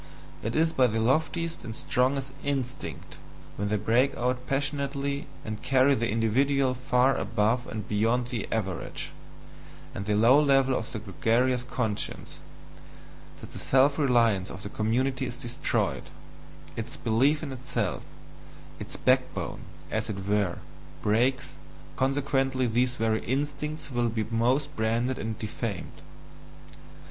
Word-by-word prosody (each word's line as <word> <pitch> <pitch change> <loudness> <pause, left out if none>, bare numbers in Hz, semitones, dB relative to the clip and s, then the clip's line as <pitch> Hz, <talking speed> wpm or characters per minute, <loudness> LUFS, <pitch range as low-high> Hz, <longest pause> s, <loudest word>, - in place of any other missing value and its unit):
It 110 - -3
is 160 +1 +3
by 130 -1 +4
the 110 -1 -1
loftiest 160 +7 0
and 110 -2 -6
strongest 135 +2 0
instincts, 135 -2 -4 0.4
when 100 - -2
they 105 - +1
break 115 +6 +2
out 125 +1 -1
passionately 140 0 -1 0.2
and 110 -1 -5
carry 135 +1 +4
the 115 -3 0
individual 130 +5 +2
far 130 +1 +2
above 115 +3 0
and 110 -1 -5
beyond 115 +4 +1
the 120 -5 -3
average, 95 -6 -3 0.8
and 100 - -5
the 105 - +2
low 120 +7 +6
level 135 -2 +4
of 110 - -3
the - - -4
gregarious 115 +4 +1
conscience, 115 -4 -3 1.0
that - - -10
the - - -7
self 140 +3 +3
reliance 115 -9 +3
of 95 - -8
the 100 - -5
community 130 +5 0
is 120 - -6
destroyed, 130 +1 -1 0.7
its - - -4
belief 135 +8 +2
in 145 - -4
itself, 120 -6 -2 0.8
its - - -5
backbone, - - +1 0.3
as 110 0 -1
it 95 -2 -5
were, 100 -4 +1 0.5
breaks, 120 +5 +2 0.4
consequently 135 -1 +1
these 125 +2 +1
very 110 -1 0
instincts 145 +3 -2
will 120 -1 +1
be 110 -1 -1
most 130 +6 +1
branded 115 +3 0
and 110 0 -3
defamed. 110 -3 -5
125 Hz, 135 wpm, -28 LUFS, 110-135 Hz, 1.0 s, low